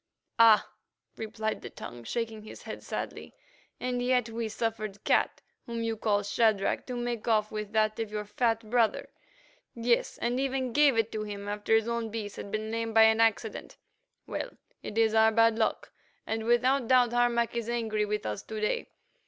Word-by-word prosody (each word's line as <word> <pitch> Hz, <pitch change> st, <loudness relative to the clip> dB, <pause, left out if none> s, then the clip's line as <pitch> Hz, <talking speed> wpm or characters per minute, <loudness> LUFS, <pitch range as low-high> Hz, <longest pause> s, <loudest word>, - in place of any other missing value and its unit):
"Ah!" 225 Hz, -2 st, +7 dB, 0.5 s
replied 220 Hz, 0 st, -3 dB
the -, -, -7 dB
Tongue, 120 Hz, -1 st, -9 dB
shaking 225 Hz, -, -3 dB
his 215 Hz, -, -11 dB
head -, -, -7 dB
sadly, -, -, -6 dB, 0.4 s
"and 250 Hz, 0 st, -2 dB
yet 250 Hz, -2 st, +1 dB
we 225 Hz, 0 st, -3 dB
suffered 215 Hz, -2 st, -3 dB
Cat, -, -, +1 dB, 0.2 s
whom 230 Hz, -1 st, -3 dB
you 225 Hz, 0 st, -1 dB
call 210 Hz, -1 st, +1 dB
Shadrach, 205 Hz, -1 st, +1 dB
to 250 Hz, -, -4 dB
make 240 Hz, -2 st, -3 dB
off 215 Hz, -2 st, +2 dB
with 210 Hz, -1 st, -5 dB
that 215 Hz, 0 st, +2 dB
of 225 Hz, -2 st, -2 dB
your 210 Hz, 0 st, -3 dB
fat 225 Hz, +1 st, 0 dB
brother; 230 Hz, -1 st, +1 dB, 0.7 s
yes, 235 Hz, 0 st, +1 dB
and 240 Hz, +2 st, -1 dB
even 265 Hz, -2 st, -1 dB
gave 290 Hz, -3 st, +5 dB
it 225 Hz, 0 st, +1 dB
to 215 Hz, -, -3 dB
him 205 Hz, -1 st, -6 dB
after 210 Hz, +2 st, +1 dB
his 225 Hz, 0 st, +2 dB
own 235 Hz, -1 st, -2 dB
beast 210 Hz, -2 st, -5 dB
had -, -, -6 dB
been 215 Hz, +1 st, -3 dB
lamed 225 Hz, 0 st, -3 dB
by 225 Hz, -, +8 dB
accident. 220 Hz, 0 st, +1 dB, 0.5 s
Well, -, -, -5 dB, 0.2 s
it 210 Hz, -, -7 dB
is 225 Hz, -1 st, +3 dB
our 220 Hz, 0 st, +5 dB
bad 230 Hz, 0 st, +4 dB
luck, 220 Hz, -, -1 dB, 0.3 s
and 220 Hz, 0 st, -3 dB
without 245 Hz, +2 st, +3 dB
doubt 245 Hz, -2 st, +4 dB
Harmac 240 Hz, -1 st, +2 dB
is 235 Hz, -1 st, -2 dB
angry 220 Hz, -3 st, 0 dB
with 210 Hz, 0 st, -3 dB
us 105 Hz, -1 st, -3 dB
to 220 Hz, -, -6 dB
day. 210 Hz, -, -1 dB
225 Hz, 180 wpm, -29 LUFS, 215-235 Hz, 0.7 s, by